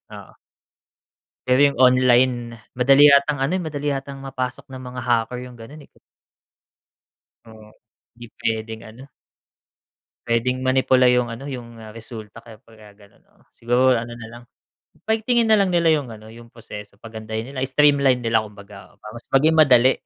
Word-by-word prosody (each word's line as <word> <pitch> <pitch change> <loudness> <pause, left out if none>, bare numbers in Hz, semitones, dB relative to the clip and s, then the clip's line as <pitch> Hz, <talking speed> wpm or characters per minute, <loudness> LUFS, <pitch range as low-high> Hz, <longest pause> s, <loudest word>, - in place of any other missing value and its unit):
oo. - - -13 1.1
Pero 130 +2 +3
yung 140 -2 +3
online 125 -2 +2 0.2
madali 135 +3 +5
yatang 140 0 +4
ano, 135 +6 -1
madali 145 -3 -3
yatang 135 0 -7
mapasok 130 -2 -6
ng 130 -2 -11
mga 125 0 -8
hacker 120 0 -1
yung 125 - -12
ganun, 120 +6 -13
eh. - - -34 1.6
Oo. 110 -1 -16 0.5
Hindi 120 - -11 0.2
puwedeng 110 0 -3
ano. 120 +4 -13 1.2
Puwedeng 120 +2 0
manipula 130 -1 +3
yung 125 -1 +2
ano, 125 +5 -8
yung 120 -4 -9 0.2
resulta 110 -1 -11
kaya 110 -2 -15
'pag 110 -4 -19
gano'n. 100 -1 -22 0.3
Siguro 125 +2 +2
ano 120 0 -4
na 115 - -9
lang 120 +1 -13 0.6
paigtingin 225 +2 +1
nalang 210 -3 +3
nila 170 -2 +2
yung 145 -5 -1
ano, 110 0 -12
yung 115 0 -14
proseso. 105 -3 -12
Pagandahin 110 +2 -8
nila, 130 - -5
streamline 140 -3 +2
nila 115 -1 +2
kumbaga 100 -2 -13
para 105 - -12
mas 120 - -12
maging 150 +4 +3
madali 130 -3 +5
125 Hz, 145 wpm, -21 LUFS, 115-135 Hz, 1.6 s, madali